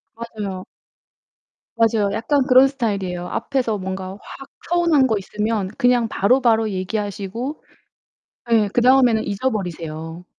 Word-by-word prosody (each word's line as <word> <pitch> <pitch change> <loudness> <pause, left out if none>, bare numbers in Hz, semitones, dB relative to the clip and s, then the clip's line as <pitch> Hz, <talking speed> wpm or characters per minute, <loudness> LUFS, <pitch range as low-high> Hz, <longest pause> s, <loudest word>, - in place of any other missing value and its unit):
맞아요. 210 -5 -6 1.1
맞아요. 225 -3 +2
약간 270 +6 +1
그런 260 +1 +7
스타일이에요. 200 -9 -3
앞에서 250 -6 -1
뭔가 190 0 -5
확 275 0 -11 0.2
서운한 335 -6 +3
거 220 -3 +1
있으면 210 0 -2
그냥 245 -2 +3
바로바로 225 +1 +2
얘기하시고 205 +6 -4 0.9
예 215 -3 +4
그다음에는 245 -2 +4
잊어버리세요. 175 -7 -4
220 Hz, 300 characters per minute, -21 LUFS, 195-250 Hz, 1.1 s, 그런